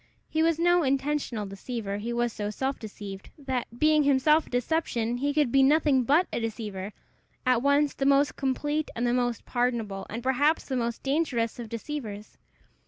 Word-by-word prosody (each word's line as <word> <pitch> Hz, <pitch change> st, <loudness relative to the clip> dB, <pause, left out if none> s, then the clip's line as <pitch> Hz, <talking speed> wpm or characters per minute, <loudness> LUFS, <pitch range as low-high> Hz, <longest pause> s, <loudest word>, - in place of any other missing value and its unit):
He 315 Hz, -, 0 dB
was 325 Hz, -1 st, +3 dB
no 350 Hz, +1 st, +4 dB
intentional 270 Hz, -5 st, -1 dB
deceiver; 200 Hz, +1 st, -5 dB
he 225 Hz, +3 st, -4 dB
was 240 Hz, -1 st, 0 dB
so 205 Hz, -1 st, -3 dB
self 265 Hz, +6 st, -2 dB
deceived, 200 Hz, -3 st, -8 dB
that, 260 Hz, -4 st, -3 dB
being 305 Hz, +2 st, +4 dB
himself 290 Hz, +3 st, +3 dB
a -, -, -13 dB
deception, 245 Hz, -3 st, -1 dB
he 285 Hz, +3 st, 0 dB
could 290 Hz, -4 st, +1 dB
be 275 Hz, -, +5 dB
nothing 275 Hz, -2 st, +4 dB
but 300 Hz, +9 st, +4 dB
a -, -, 0 dB
deceiver 210 Hz, -4 st, -4 dB, 0.5 s
at 250 Hz, -2 st, +3 dB
once 280 Hz, +1 st, +3 dB
the 270 Hz, -, -1 dB
most 280 Hz, +1 st, +3 dB
complete 295 Hz, +3 st, -1 dB
and 235 Hz, -, -1 dB
the 240 Hz, -, +2 dB
most 245 Hz, -2 st, -1 dB
pardonable, 235 Hz, -6 st, -1 dB
and 230 Hz, +2 st, -5 dB
perhaps 285 Hz, +5 st, +2 dB
the 265 Hz, -, -3 dB
most 235 Hz, -1 st, -2 dB
dangerous 270 Hz, -6 st, 0 dB
of 230 Hz, -2 st, -6 dB
deceivers. 225 Hz, -4 st, -6 dB
255 Hz, 175 wpm, -27 LUFS, 230-290 Hz, 0.5 s, be